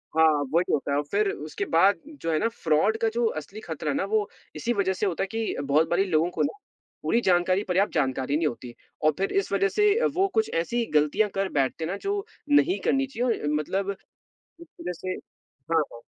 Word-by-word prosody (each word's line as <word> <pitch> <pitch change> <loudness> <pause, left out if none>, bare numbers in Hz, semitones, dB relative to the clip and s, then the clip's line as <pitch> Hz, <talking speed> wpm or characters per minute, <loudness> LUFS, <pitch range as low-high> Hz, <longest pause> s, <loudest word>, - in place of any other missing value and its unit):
हाँ, 160 0 +6 0.3
वही 175 +2 +2
होता 140 -1 0
है 140 - +2
और 145 - +1
फिर 205 0 +2
उसके 150 +1 -5
बाद 190 +2 +5 0.2
जो 165 - -1
है 155 - +2
ना - - +2
फ्रॉड 200 -1 +1
का 225 - +3
जो 235 0 +1
असली 195 +8 -10
खतरा 155 -5 -3
ना 140 - 0
वो 215 -2 +2 0.3
इसी 240 - -1
वजह 195 -3 +1
से 200 - -2
होता 190 -1 0
है - - -2
कि 225 -1 -2
बहुत 145 +3 +2
बारी 180 +3 +3
लोगों 160 +1 +2
को - - -2
ना 285 - -2 0.5
पूरी 235 - +2
जानकारी 185 0 +2
पर्याप्त 190 +2 +1
जानकारी 135 -1 0
नहीं 160 - +1
होती 120 -2 -6 0.3
और 155 - +6
फिर 195 - -1
इस 395 - -4
वजह 195 0 +3
से 420 - +3 0.2
वो 380 +2 +3
कुछ 445 -1 +2
ऐसी 235 +7 -1
गलतियाँ 150 +8 +3
कर 195 0 0
बैठते 135 +3 0
हैं 160 - -2
ना, 195 - -3
जो 400 - -2 0.2
नहीं 290 +6 +4
करनी 270 0 +2
चाहिए 245 -2 -1
और - - -1
मतलब 190 +6 -1 0.7
इस 340 - -11
वजह 180 - -3
से 185 +2 -4
हाँ, 160 +4 -4
हाँ। 115 - -10
190 Hz, 220 wpm, -26 LUFS, 155-225 Hz, 0.7 s, हाँ